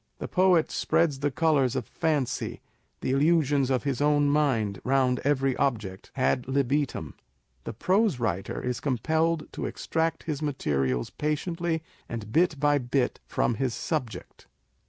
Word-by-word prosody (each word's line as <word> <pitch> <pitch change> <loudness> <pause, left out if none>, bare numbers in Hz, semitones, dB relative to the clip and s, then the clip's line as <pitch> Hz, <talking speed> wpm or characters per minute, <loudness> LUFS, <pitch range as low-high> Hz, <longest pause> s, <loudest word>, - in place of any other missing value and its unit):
The - - -5
poet 180 -3 +3
spreads 150 -5 +1
the 145 +1 +1
colours 140 -3 +2
of - - -2
fancy, 150 -6 -1 0.4
the - - -1
illusions 145 -2 +3
of 130 -2 +1
his 140 -2 -1
own 145 -1 +3
mind, 120 -10 +1
round 130 -1 +2
every 135 -2 +1
object, 110 -9 -2
ad 130 -1 +1
libitum; 135 - 0 0.5
the - - -4
prose 185 - +1
writer 95 -5 -2
is 125 -1 -2
compelled 160 +5 0
to - - -3
extract 160 0 -2
his 150 -2 -3
materials 70 - -1
patiently 160 +2 -2 0.3
and 110 -2 -6
bit 165 +1 +2
by 145 0 +3
bit, 125 0 -1
from - - +1
his 130 -4 0
subject. 110 - -4
140 Hz, 140 wpm, -27 LUFS, 125-155 Hz, 0.5 s, poet